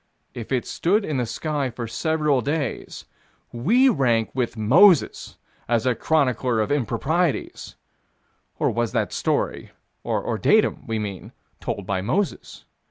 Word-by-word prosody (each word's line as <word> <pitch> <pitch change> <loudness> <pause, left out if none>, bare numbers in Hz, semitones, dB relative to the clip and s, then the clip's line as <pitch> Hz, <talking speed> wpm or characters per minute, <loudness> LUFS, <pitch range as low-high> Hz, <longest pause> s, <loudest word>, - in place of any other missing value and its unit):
If 120 0 -8
it 130 -2 0
stood 200 +5 0
in 150 - -2
the 125 -2 -1
sky 145 +3 -2
for 120 0 -6
several 150 +3 0
days, 145 -1 -3 0.5
we 215 - +3
rank 120 - +2
with 125 -2 -2
Moses 155 - +4 0.3
as 115 -1 +1
a 125 - +3
chronicler 125 -5 +1
of 110 - -1
improprieties 145 +5 -1 0.8
or - - +1
was 120 -1 -2
that - - -1
story, - - -2 0.3
or - - -2
datum, - - +2
we 115 - -1
mean, 100 -4 -6 0.3
told 100 - -4
by 95 -1 -1
Moses? 175 - -3
130 Hz, 135 wpm, -23 LUFS, 115-155 Hz, 0.8 s, Moses